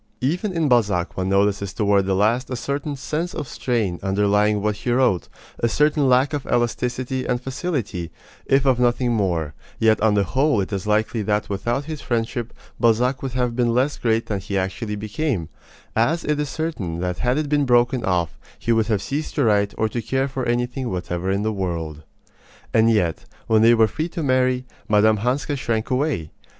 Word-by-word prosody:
Even 175 - 0
in 165 -4 0
Balzac 105 -8 +2
one 95 0 -1
notices 100 0 +1
toward 100 -3 +2
the 95 - +1
last 115 +6 +1
a 130 - -2
certain 140 +3 -3
sense 155 +7 -3
of 145 - -4
strain 110 -11 -1
underlying 105 +2 +2
what 105 0 -1
he 120 - -2
wrote, 120 -8 +2 0.3
a 115 - +1
certain 150 0 +2
lack 130 +4 +3
of 145 -2 -3
elasticity 125 +2 -1
and 125 - 0
facility, 125 - -3 0.4
if 135 0 +3
of 130 -2 +3
nothing 120 0 +2
more; 85 -8 0 0.2
yet 110 -1 +3
on 110 -1 +3
the 100 - +3
whole 135 - +1
it 100 +1 -2
is 100 +1 -3
likely 110 +2 +1
that 105 0 -1
without 120 +7 -1
this 155 -2 -6
friendship 120 0 -2 0.3
Balzac 125 +3 +2
would 135 -2 -4
have 125 -2 0
been 120 -1 +1
less 135 +4 +1
great 115 -1 +1
than 105 -2 -2
he 100 +1 -3
actually 95 +3 -2
became, 105 - -2 0.5
as 150 +10 +2
it 150 -1 0
is 150 -2 -1
certain 120 - -3
that 90 -1 -2
had 125 +2 +1
it 155 -1 -1
been 145 0 +2
broken 120 0 +3
off 85 -4 -1 0.2
he 115 - -1
would 110 -2 +2
have 105 -3 0
ceased 145 +7 -3
to 145 - +2
write 105 -3 +2
or 110 - +2
to 120 +2 -3
care 135 +4 0
for 135 -1 -4
anything 120 +1 -1
whatever 90 0 -3
in 100 +1 0
the 110 0 0
world. 85 -6 -3 0.7
And 110 0 +5
yet, 95 -8 +1 0.2
when 110 -1 +3
they 115 +1 +6
were 110 -1 +5
free 160 +9 -3
to 165 -1 -4
marry, 130 -1 +2 0.2
Mme. 105 +1 +4
Hanska 130 +7 -1
shrank 115 -3 -2
away. 130 - 0
115 Hz, 195 wpm, -22 LUFS, 100-130 Hz, 0.7 s, they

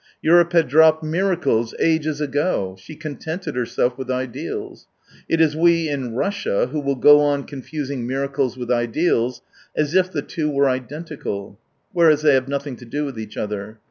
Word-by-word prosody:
Europe 170 +1 +5
had 165 -4 +4
dropped 160 +3 +5
miracles 160 -9 0
ages 155 -2 +1
ago; 145 - -1
she 125 +11 -11
contented 155 +1 -6
herself 125 +1 -1
with 130 -1 -6
ideals. 140 - -4 0.4
It 165 - +2
is 155 -2 +3
we 165 0 +3
in 130 -5 -3
Russia 200 - 0
who 155 - -2
will 140 -1 -1
go 145 +3 +7
on 145 -1 +1
confusing 140 -2 -5
miracles 135 -1 -1
with 125 -1 -4
ideals, 120 0 0 0.3
as 150 0 0
if 185 0 +3
the - - -3
two 155 -4 -2
were 140 -1 +2
identical, 130 -7 -5 0.3
whereas 155 -3 +4
they 150 -2 +5
have 130 0 +2
nothing 140 -1 -3
to 125 - -12
do 145 +6 -3
with 135 -5 -6
each 110 -1 -8
other. 105 +1 -4
145 Hz, 170 wpm, -21 LUFS, 125-160 Hz, 0.4 s, go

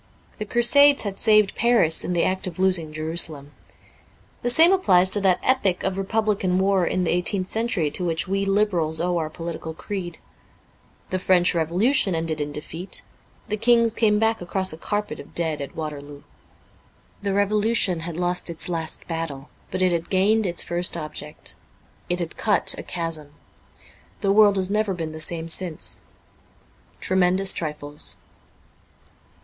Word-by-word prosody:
The 215 - -3
Crusades 275 +6 +5
had 200 -2 -5
saved 215 -3 +4
Paris 230 -9 +2
in 180 - -3
the 170 - +1
act 185 0 -1
of 180 - -7
losing 185 -4 +1
Jerusalem. 155 -2 -2 0.9
The 245 - -1
same 325 +8 +7
applies 185 - +4
to 205 - +3
that 185 -2 +2
epic 200 -8 +1
of 190 -1 -1
Re 195 - -2
publican 205 -3 0
war 190 -2 +2
in 185 - -1
the 170 - 0
eighteenth 185 +2 +2
century 220 -10 -1
to 180 - -4
which 165 -1 -1
we 195 +1 -1
Liberals 195 -6 0
owe 175 0 0
our 155 -1 -3
political 165 -1 -7
creed. 175 -3 -6 0.9
The 185 - -1
French 180 -1 +3
Revolution 180 - +2
ended 160 -2 -2
in 145 0 -3
defeat; 160 +5 -5 0.4
the 215 - -2
kings 230 0 +3
came 215 -2 +2
back 225 0 0
across 185 0 -2
a - - -9
carpet 210 +4 -4
of - - -13
dead 160 -3 -1
at 140 - -8
Waterloo. 145 -2 -7 1.0
The 200 - -3
Revolu 210 +3 +1
tion 180 -6 +1
had 165 0 -6
lost 180 0 -2
its 165 -1 -5
last 165 -2 -5
battle, 165 -4 -5 0.2
but 185 0 -2
it 185 - +3
had 170 -1 -2
gained 205 +3 +2
its 175 - 0
first 175 0 -1
object. 150 -1 -8 0.6
It 175 - 0
had 170 -2 -5
cut 210 -2 +2
a - - -6
chasm. 165 -4 -4 0.9
The 200 -2 +1
world 205 -1 +5
has 190 0 0
never 210 -2 0
been 165 -2 -5
the 155 - -9
same 165 +1 -2
since. 165 -1 +1 0.5
' - - -34
Tremendous 190 +1 +2
Trifles. 150 -2 -1
180 Hz, 165 wpm, -23 LUFS, 165-205 Hz, 1.0 s, same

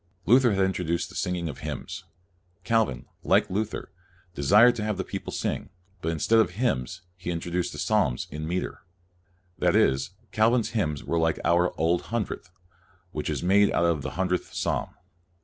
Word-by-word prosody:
Luther 125 0 +5
had 95 -1 +3
introduced 85 -2 -1
the 90 - -13
singing 90 -2 -1
of 75 - -6
hymns. - - -6 0.6
Calvin, 110 - +1 0.2
like - - +3
Luther, 105 0 -3 0.4
desired 105 - +6
to 105 - -2
have 105 -2 -1
the 95 - -1
people - - -6
sing, - - -3 0.3
but 80 - -1
in 80 - -3
stead 115 +9 +3
of 110 - +4
hymns 90 - -1
he 90 -1 -7
introduced 85 +1 -2
the - - -8
psalms - - +1
in 75 +2 -5
meter. 90 +2 -3 0.8
That - - +3
is, 65 0 +3 0.2
Calvin's 115 +2 +3
hymns 75 -11 -1
were 85 - 0
like 80 0 +1
our 85 +1 +3
Old 85 +2 +2
Hundredth, 110 -7 -3 0.6
which - - -3
is - - -2
made 100 +3 +4
out 85 - +2
of 85 -4 +1
the - - -5
Hundredth 90 -1 -1
Psalm. - - -1
90 Hz, 170 wpm, -26 LUFS, 80-105 Hz, 0.8 s, desired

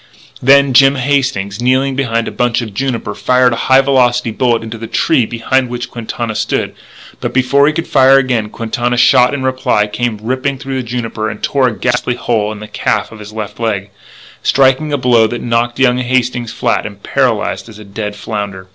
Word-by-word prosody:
Then 140 +1 +5
Jim 135 +2 +6
Hastings, 125 -7 -1
kneeling 130 +2 +1
behind 115 -4 -1
a - - -4
bunch 120 0 0
of 110 -3 -8
juniper, 125 +2 -3
fired 125 -1 +2
a 115 - -4
high 130 +1 +7
velocity 125 -3 +2
bullet 115 0 0
into 115 0 -7
the 115 - -6
tree 115 0 +1
behind 125 +2 0
which 120 0 -5
Quintana 115 -1 -4
stood; 105 - -2 0.5
but - - -4
before 140 +2 +3
he 155 - +2
could 165 +1 -3
fire 135 0 +5
again 125 -5 0
Quintana's 120 +2 -2
shot 125 -1 +5
in 140 -2 -3
reply 130 -5 +1
came 110 +1 -3
ripping 130 +5 -2
through 135 0 -5
the 120 - -10
juniper 115 -2 -3
and 105 - -9
tore 135 -2 +2
a 110 - -3
ghastly 125 0 -1
hole 110 -4 -1
in 105 -1 -8
the 105 - -8
calf 105 -1 -1
of 110 - -11
his 105 0 -10
left 110 -1 -7
leg, 105 -3 -2 0.5
striking 135 +3 +2
a 145 - +1
blow 120 -3 +3
that 120 +2 -4
knocked 120 0 0
young 125 -1 +3
Hastings 125 -2 -1
flat 120 -2 -1
and 100 -1 -13
paralysed 115 -6 -1
as 110 - -12
a 105 - -12
dead 105 +1 -5
flounder. 100 -3 -6
120 Hz, 200 wpm, -14 LUFS, 110-130 Hz, 0.5 s, high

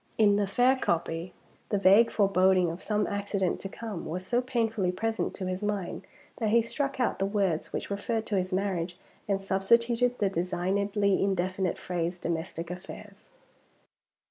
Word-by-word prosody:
In 205 -2 +5
the 205 -1 +1
fair 245 +6 +4
copy, 170 -5 -1 0.4
the 205 - +1
vague 200 +4 +6
foreboding 190 -3 +3
of 170 - -8
some 210 -1 0
accident 200 -2 -1
to 195 - -6
come 215 -4 -6
was 180 +4 -4
so 245 +4 +1
painfully 225 -7 0
present 225 +4 -2
to 190 - -4
his 185 +1 -3
mind, 205 -3 -3 0.3
that 220 -3 0
he 230 +1 +4
struck 275 +3 -2
out 250 - 0
the 195 - +1
words 195 -6 0
which - - -4
referred 220 +2 -2
to 210 - -2
his 185 +1 -3
marriage, 185 -2 -1 0.3
and 200 -1 +1
substituted 235 +6 +2
the 205 - +2
designedly 195 +3 0
indefinite 185 -1 0
phrase, 175 0 -3
"domestic 170 0 -4
affairs." 200 +3 -10
195 Hz, 160 wpm, -28 LUFS, 185-220 Hz, 0.4 s, vague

